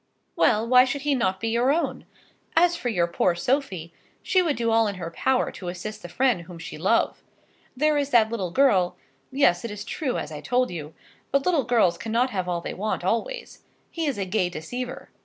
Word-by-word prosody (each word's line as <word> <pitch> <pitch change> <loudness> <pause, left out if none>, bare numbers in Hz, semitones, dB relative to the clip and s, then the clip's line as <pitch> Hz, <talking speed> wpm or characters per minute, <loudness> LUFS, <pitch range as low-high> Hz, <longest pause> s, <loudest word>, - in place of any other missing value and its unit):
] - - -47
Well, 220 0 +3
why 250 +1 +7
should 265 +2 -3
he 290 -1 +2
not 190 -8 0
be 225 - -2
your 240 +4 +2
own? 330 +3 -1 0.5
As 345 +1 +4
for 250 - -3
your 175 -7 +2
poor 170 +1 +1
Sophie, 185 - -1 0.3
she 370 - +3
would 320 -5 0
do 230 -1 0
all 225 0 +4
in 200 - -3
her 170 -2 -6
power 260 +9 +1
to 180 - -9
assist 210 +5 -6
the 175 - -9
friend 245 -2 +1
whom 170 0 -11
she 165 - -8
love. 195 +7 +1 0.6
There 300 +1 +3
is 285 -1 -1
that 230 -4 +4
little 195 -6 -2
girl, 185 -5 +3 0.3
yes; 220 -11 +3
it 235 - -4
is 210 0 -7
true 275 -1 -2
as - - -5
I 150 - -7
told 250 -2 +1
you. 155 -3 -7 0.4
But 275 0 +2
little 330 -7 +2
girls 190 -8 +2
cannot 230 +6 0
have 185 -4 -2
all 175 -1 -1
they - - -5
want 210 -1 -2
always. 355 - -2 0.3
He 330 -2 -2
is 280 - -1
a 195 - -2
gay 185 -1 0
deceiver. 245 +11 -6
225 Hz, 215 wpm, -25 LUFS, 180-265 Hz, 0.6 s, why